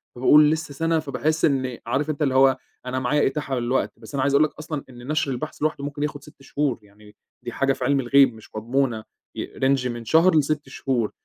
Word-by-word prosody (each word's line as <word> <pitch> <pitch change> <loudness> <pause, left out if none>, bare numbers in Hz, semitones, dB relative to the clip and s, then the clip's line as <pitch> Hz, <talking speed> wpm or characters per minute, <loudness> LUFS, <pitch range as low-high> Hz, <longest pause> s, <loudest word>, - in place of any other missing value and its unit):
فباقول 150 +4 +6
لسه 160 -2 -3
سَنة، 165 +3 0
فباحس 155 +1 0
إنّي 130 -4 -1
عارف 135 +6 -1
أنت 155 0 -3
اللي 135 -3 +1
هو 135 0 +5 0.3
أنا 130 +1 -2
معايا 140 +3 +2
إتاحة 135 -2 -2
للوقت، 120 +2 -1
بس - - -13
أنا 140 - -1
عايز 140 +1 +1
أقول 140 +2 +5
لك 155 - -1
أصلًا 155 -2 -5
إن 120 -1 -12
نشْر 155 -2 0
البحث 135 +5 -6
لوحده 150 -2 -1
ممكن 145 0 -4
ياخد 145 -1 -4
6 145 -1 -17
شهور، 135 -2 -2
يعني 105 0 -19 0.3
دي - - -5
حاجة 135 0 +1
في - - -6
عِلم 140 -1 +2
الغيب 135 0 +4
مش 110 -1 -16
مضمونة 115 0 -1 0.3
ي - - -4
range 135 -1 +2
من 120 -1 -6
شهر 165 +8 +4
ل6 150 -1 0
شهور، 125 -4 -1
135 Hz, 220 wpm, -23 LUFS, 125-150 Hz, 0.3 s, فباقول